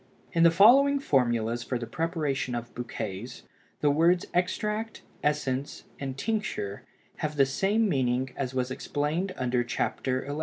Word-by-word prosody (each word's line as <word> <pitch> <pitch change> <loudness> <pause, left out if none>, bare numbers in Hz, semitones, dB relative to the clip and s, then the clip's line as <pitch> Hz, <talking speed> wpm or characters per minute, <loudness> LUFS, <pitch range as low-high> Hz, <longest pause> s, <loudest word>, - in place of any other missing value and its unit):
In 165 - +2
the 170 - +8
following 260 +11 +6
formulas 120 - +1
for 125 - -2
the 120 - -5
preparation 150 -5 -2
of 120 0 -6
bouquets, 115 -2 -6 0.4
the 145 - +4
words 170 +4 +3
extract, 210 +5 -1 0.2
essence, 140 -2 -1 0.2
and 135 -1 -4
tincture 210 - -2 0.3
have 155 0 -3
the 140 -2 +5
same 200 +10 +1
meaning 130 -5 0
as 130 -1 -3
was 130 0 -1
explained 150 +8 -2
under 125 -1 +1
Chapter 130 +1 -2
XI. 145 +2 -3
140 Hz, 145 wpm, -28 LUFS, 125-175 Hz, 0.4 s, the